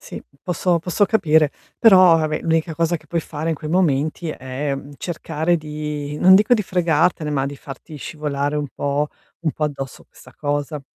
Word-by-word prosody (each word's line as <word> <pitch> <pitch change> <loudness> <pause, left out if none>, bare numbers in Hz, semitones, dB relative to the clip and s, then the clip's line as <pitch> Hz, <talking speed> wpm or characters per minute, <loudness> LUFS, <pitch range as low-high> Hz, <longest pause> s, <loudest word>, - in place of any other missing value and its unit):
Sì, - - -9 0.2
posso 180 0 +1
posso 180 +4 +1
capire, 160 -8 +3 0.3
però, 185 -6 +7
vabbè, 155 -1 -1
l'unica 165 0 0
cosa 170 +1 +1
che 155 - -23
puoi 170 +2 -1
fare 155 +1 -5
in 165 - +1
quei 155 +1 -7
momenti 160 -2 +1
è, 135 0 -3
mhmm, 140 +1 -9
cercare 170 0 -1
di 150 -1 -5
non 185 +1 +7
dico 210 +5 +4
di 210 - 0
fregartene, 170 -3 +1
ma 135 -2 0
di 140 - -6
farti 140 +3 -10
scivolare 145 -1 -3
un 150 -1 -1
po' 145 +1 -1 0.3
un 165 -2 0
po' 155 - -2
addosso 135 -3 -5
questa - - -18
cosa, 145 0 -2
155 Hz, 180 wpm, -21 LUFS, 145-170 Hz, 0.3 s, però